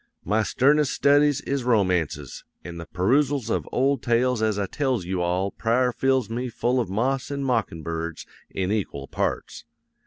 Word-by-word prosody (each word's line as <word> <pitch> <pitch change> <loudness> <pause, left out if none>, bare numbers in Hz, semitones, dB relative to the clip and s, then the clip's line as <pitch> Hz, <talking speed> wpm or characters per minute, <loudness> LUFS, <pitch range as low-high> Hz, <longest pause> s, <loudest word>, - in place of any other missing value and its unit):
My 105 +5 +2
sternest 140 +6 +2
studies 145 0 +3
is 140 -2 -2
romances, 95 - 0 0.2
an' 85 0 -8
the 85 -1 -8
peroosals 125 - +1
of - - -1
old 135 +2 +1
tales 120 0 +1
as 110 -2 +1
I 100 - 0
tells 130 - -1
you 90 0 -2
all 90 +3 0
prior 125 +2 +1
fills 130 -1 +1
me 125 +3 -3
full 120 +2 0
of 115 -7 -1
moss 130 +7 -1
an' 140 -1 -3
mockin' 110 -11 -1
birds 85 0 -4 0.2
in 95 0 -2
equal 80 -10 -3
parts. - - -3
115 Hz, 165 wpm, -24 LUFS, 95-130 Hz, 0.2 s, studies